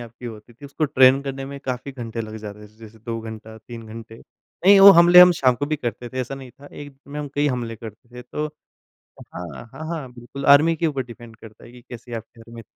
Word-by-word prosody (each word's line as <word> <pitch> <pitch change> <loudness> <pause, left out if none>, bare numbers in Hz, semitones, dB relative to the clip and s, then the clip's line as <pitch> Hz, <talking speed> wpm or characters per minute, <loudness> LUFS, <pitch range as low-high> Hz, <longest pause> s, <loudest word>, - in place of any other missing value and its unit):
आपकी 120 +1 -10
होती 110 +1 -11
थी 120 +5 -17
उसको 140 +2 -3
ट्रेन 130 -1 +5
करने 135 -1 -5
में 140 0 -8
काफ़ी 130 +1 -5
घंटे 115 -3 -6
लग 110 0 -7
जाते 105 -1 -10
थे 110 +1 -24
जैसे 110 0 -15
2 115 +1 -5
घंटा 110 0 -10
3 115 0 -11
घंटे। 110 0 -11 0.5
नहीं, 200 +1 +7
वो 200 +1 +11
हमले 175 +1 +7
हम 180 0 +8
शाम 130 -2 +4
को 145 - -4
भी 155 +1 -2
करते 120 -1 -5
थे 130 +1 -4
ऐसा 130 +2 -5
नहीं 135 -2 -11
था, 140 +3 -17
एक 145 -2 -11
में 145 +1 -7
हम 145 - -6
कई 145 +1 +1
हमले 120 -3 -4
करते 115 0 -12
थे। 125 - -8
तो 150 +5 -4 0.9
हाँ, 90 - -9
हाँ, 160 - -8
हाँ। 150 -7 -6
बिल्कुल 125 +3 -10
आर्मी 150 +4 +6
के 165 - 0
ऊपर 140 -4 -2
डिपेंड 120 -1 -13
करता 110 -1 -15
है 120 - -15
कि 125 - -14
कैसे 120 0 -9
आपके 115 +1 -9
घर 115 +1 -16
में 115 - -9
120 Hz, 245 wpm, -22 LUFS, 115-140 Hz, 0.9 s, वो